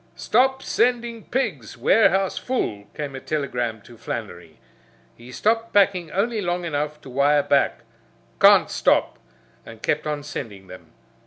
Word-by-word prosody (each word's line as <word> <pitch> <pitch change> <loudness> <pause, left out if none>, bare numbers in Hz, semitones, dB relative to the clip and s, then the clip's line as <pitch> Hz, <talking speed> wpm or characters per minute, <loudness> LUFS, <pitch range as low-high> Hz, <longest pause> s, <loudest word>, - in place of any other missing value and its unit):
"Stop 265 +3 +1
sending 235 -2 0
pigs. 265 +1 -3
Warehouse 195 -3 +3
full," 105 - -3
came 145 -2 -5
a - - -5
telegram 125 -7 -3
to 120 -2 -16
Flannery. 90 -9 -7 0.6
He 120 +1 -13
stopped 225 - 0
packing 190 -4 +3
only 215 +5 -1
long 175 -1 -2
enough 150 -1 -3
to 135 - -12
wire 145 +2 +3
back, 140 -3 +1 0.6
"Can't - - +6
stop," - - +1 0.4
and 115 -1 -13
kept 150 +1 -1
on 150 -1 -3
sending 105 -9 -7
them. 90 -3 -13
150 Hz, 140 wpm, -23 LUFS, -, 0.6 s, Can't